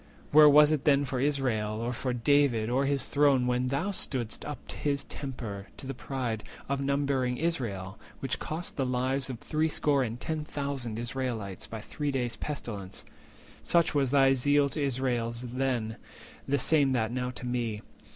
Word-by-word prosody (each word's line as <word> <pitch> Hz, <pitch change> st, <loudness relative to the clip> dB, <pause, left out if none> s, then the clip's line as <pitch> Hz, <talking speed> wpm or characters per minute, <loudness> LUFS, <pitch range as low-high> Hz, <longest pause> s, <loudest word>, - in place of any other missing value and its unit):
Where 150 Hz, 0 st, +9 dB
was 150 Hz, +1 st, +7 dB
it 155 Hz, -3 st, 0 dB
then 145 Hz, -1 st, +4 dB
For 130 Hz, -1 st, -2 dB
Israel, 125 Hz, -7 st, 0 dB
or 120 Hz, +2 st, -2 dB
for 125 Hz, +2 st, -2 dB
David, 125 Hz, -2 st, +2 dB
or 135 Hz, +3 st, +2 dB
his 140 Hz, -1 st, +1 dB
throne, 140 Hz, -3 st, +3 dB
When 125 Hz, 0 st, +1 dB
thou 140 Hz, +9 st, -1 dB
stood'st 125 Hz, -, -2 dB
up 150 Hz, -, -7 dB
his 140 Hz, -1 st, -1 dB
tempter 115 Hz, -8 st, -6 dB
to -, -, -9 dB
the 135 Hz, -, -4 dB
pride 125 Hz, -4 st, -3 dB, 0.2 s
Of 140 Hz, 0 st, -1 dB
numbering 140 Hz, -2 st, 0 dB
Israel—which 120 Hz, -, -3 dB
cost 165 Hz, +3 st, -5 dB
the 135 Hz, -, +1 dB
lives 130 Hz, +1 st, 0 dB
410 130 Hz, -, -4 dB
of -, -, -16 dB
threescore 150 Hz, -2 st, +2 dB
and 120 Hz, -1 st, -3 dB
ten 160 Hz, +1 st, -3 dB
thousand 140 Hz, -6 st, -4 dB
Israelites 120 Hz, -5 st, -4 dB
By 110 Hz, -1 st, -6 dB
three 145 Hz, +6 st, -3 dB
days' 125 Hz, -4 st, -1 dB
pestilence? 105 Hz, -8 st, -6 dB, 0.6 s
Such 170 Hz, -1 st, +2 dB
was 140 Hz, -3 st, +2 dB
thy 135 Hz, 0 st, +5 dB
zeal 145 Hz, +2 st, +3 dB
To 150 Hz, +1 st, -2 dB
Israel 125 Hz, -3 st, 0 dB
then, 125 Hz, -3 st, -1 dB, 0.5 s
the 140 Hz, -, +2 dB
same 140 Hz, 0 st, +4 dB
that 110 Hz, -3 st, 0 dB
now 125 Hz, 0 st, -2 dB
to 125 Hz, 0 st, -8 dB
me. 120 Hz, -4 st, -2 dB
130 Hz, 170 wpm, -29 LUFS, 120-140 Hz, 0.6 s, Where